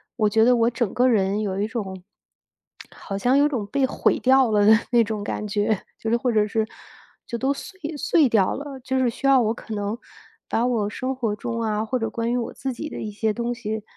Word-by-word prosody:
我 215 Hz, -3 st, +2 dB
觉 220 Hz, +1 st, +3 dB
得 250 Hz, 0 st, +5 dB
我 230 Hz, 0 st, +3 dB
整 235 Hz, -3 st, -2 dB
个 250 Hz, +1 st, +3 dB
人 205 Hz, -2 st, +2 dB
有 195 Hz, -2 st, -2 dB
一 205 Hz, -, +1 dB
种 190 Hz, -5 st, -5 dB, 0.9 s
好 195 Hz, -, -6 dB
像 245 Hz, +6 st, +2 dB
有 290 Hz, +1 st, +4 dB
种 235 Hz, -8 st, -2 dB
被 275 Hz, +4 st, 0 dB
毁 -, -, +1 dB
掉 260 Hz, -2 st, +4 dB
了 205 Hz, -1 st, +3 dB
的 220 Hz, -, +9 dB, 0.2 s
那 235 Hz, -1 st, +5 dB
种 210 Hz, -1 st, -4 dB
感 210 Hz, 0 st, -3 dB
觉， 205 Hz, 0 st, 0 dB
就 225 Hz, -, -3 dB
是 -, -, +4 dB
或 245 Hz, 0 st, 0 dB
者 215 Hz, -1 st, +3 dB
是， 220 Hz, +1 st, -1 dB, 0.6 s
就 235 Hz, -, -5 dB
都 270 Hz, +2 st, +1 dB
碎 380 Hz, +6 st, -10 dB, 0.2 s
碎 305 Hz, -2 st, +3 dB
掉 200 Hz, -5 st, +3 dB
了， 280 Hz, -1 st, -7 dB
就 260 Hz, +1 st, -1 dB
是 250 Hz, -2 st, +2 dB
需 250 Hz, -, -7 dB
要 270 Hz, -2 st, +6 dB
我 220 Hz, -1 st, +1 dB
可 225 Hz, -, -8 dB
能 205 Hz, +2 st, -2 dB, 0.5 s
把 235 Hz, +2 st, +1 dB
我 220 Hz, -5 st, 0 dB
生 255 Hz, +5 st, -3 dB
活 225 Hz, -5 st, -1 dB
中 230 Hz, +1 st, -4 dB
啊， 215 Hz, -1 st, 0 dB
或 255 Hz, +3 st, -1 dB
者 225 Hz, -, -2 dB
关 230 Hz, 0 st, -2 dB
于 250 Hz, -, +1 dB
我 235 Hz, -, -3 dB
自 265 Hz, -, -4 dB
己 305 Hz, +6 st, -6 dB
的 -, -, -6 dB
一 215 Hz, -, -4 dB
些 215 Hz, +1 st, -1 dB
东 240 Hz, +1 st, -2 dB
西， 220 Hz, -2 st, -4 dB
230 Hz, 255 characters per minute, -23 LUFS, 210-255 Hz, 0.9 s, 的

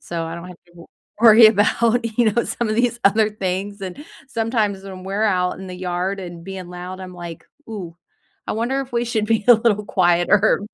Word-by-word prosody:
so 165 Hz, -1 st, -4 dB
I 165 Hz, +1 st, -6 dB
don't 170 Hz, +1 st, -8 dB
have 180 Hz, -, -11 dB
to 175 Hz, -, -24 dB
w 170 Hz, -1 st, -14 dB, 0.3 s
worry 225 Hz, -1 st, +8 dB
about, 225 Hz, +3 st, +2 dB
you 220 Hz, -3 st, +4 dB
know, 235 Hz, -, +1 dB
some 235 Hz, -2 st, -2 dB
of 215 Hz, -, 0 dB
these 240 Hz, 0 st, 0 dB
other 215 Hz, +2 st, +4 dB
things, 200 Hz, 0 st, -4 dB
and 190 Hz, +10 st, -7 dB, 0.2 s
sometimes 220 Hz, -5 st, -1 dB
when 190 Hz, -1 st, -9 dB
we're 200 Hz, +3 st, -2 dB
out 180 Hz, -3 st, 0 dB
in 190 Hz, -1 st, -8 dB
the 180 Hz, -, -7 dB
yard 180 Hz, +2 st, -3 dB
and 175 Hz, -2 st, -9 dB
being 190 Hz, -2 st, -7 dB
loud, 180 Hz, +1 st, -8 dB
I'm 185 Hz, -1 st, -9 dB
like, 170 Hz, -2 st, -9 dB, 0.2 s
"Ooh, 180 Hz, -6 st, -7 dB, 0.5 s
I -, -, -2 dB
wonder 240 Hz, +5 st, -1 dB
if 260 Hz, -, -13 dB
we 235 Hz, 0 st, 0 dB
should 220 Hz, -2 st, -1 dB
be 225 Hz, -1 st, +1 dB
a 240 Hz, -, +10 dB
little 215 Hz, -2 st, +1 dB
quieter?“ 185 Hz, +4 st, +3 dB
200 Hz, 210 wpm, -21 LUFS, 180-225 Hz, 0.5 s, a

